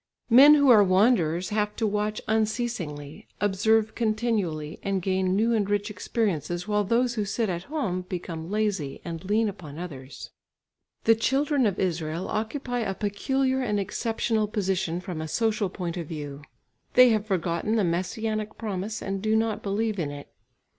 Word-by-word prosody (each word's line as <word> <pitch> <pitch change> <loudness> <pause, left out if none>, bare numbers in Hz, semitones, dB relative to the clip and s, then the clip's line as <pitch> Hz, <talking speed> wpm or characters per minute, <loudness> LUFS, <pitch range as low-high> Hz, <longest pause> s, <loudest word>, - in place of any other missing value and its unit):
Men 280 +5 +9
who 285 -3 +5
are 215 -3 +8
wanderers 185 -3 +3
have 210 -1 -1
to 225 - -1
watch 210 0 -1
unceasingly, 215 - -2
observe 215 +2 +2
continually, 215 -9 -1
and 195 -1 -1
gain 185 0 0
new 225 +3 +2
and 205 -3 +1
rich 205 +1 0
experiences, 185 - -2
while 210 -1 +1
those 235 +4 +1
who 215 -3 -1
sit 215 +2 -1
at 175 0 -3
home 240 - -2
become 170 -2 -5
lazy 200 -9 -1
and 165 0 -5
lean 215 +3 +1
upon 165 -8 -7
others. 140 -6 -8 0.7
The 225 - +6
children 270 +3 +1
of 195 - -2
Israel 165 -1 -2
occupy 245 +3 -2
a 195 -4 -2
peculiar 260 +7 0
and 210 -5 0
exceptional 220 +1 -1
position 190 -4 -1
from 175 -4 -5
a 160 - -4
social 215 +2 0
point 180 -1 -5
of 170 -3 -4
view. 145 -3 -6 0.5
They 250 0 +8
have 215 -2 +1
forgotten 180 +2 0
the 215 - +2
Messianic 215 +5 -2
promise 210 0 -4
and 195 0 -3
do 215 +1 +1
not 220 -1 0
believe 210 +1 -1
in 155 -4 -1
it. 145 0 -9
205 Hz, 160 wpm, -26 LUFS, 180-225 Hz, 0.7 s, Men